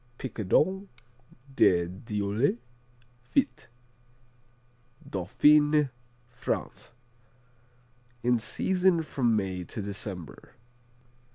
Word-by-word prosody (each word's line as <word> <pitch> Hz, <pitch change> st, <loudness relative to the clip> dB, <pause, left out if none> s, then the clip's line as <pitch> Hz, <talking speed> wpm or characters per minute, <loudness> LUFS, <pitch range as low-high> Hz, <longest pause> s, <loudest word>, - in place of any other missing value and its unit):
Picodon 150 Hz, -, 0 dB, 0.7 s
de 85 Hz, -7 st, +4 dB
Dieule 105 Hz, +5 st, -1 dB, 0.6 s
Fit 125 Hz, 0 st, -1 dB, 1.4 s
Dauphiné, 150 Hz, -, +3 dB, 0.4 s
France 120 Hz, -1 st, -5 dB, 1.3 s
In 120 Hz, -1 st, +3 dB
season 180 Hz, -, +1 dB
from 120 Hz, -7 st, +1 dB
May 95 Hz, -3 st, -2 dB
to 90 Hz, -, -8 dB
December. 100 Hz, -5 st, -6 dB
120 Hz, 65 wpm, -28 LUFS, 100-150 Hz, 1.4 s, de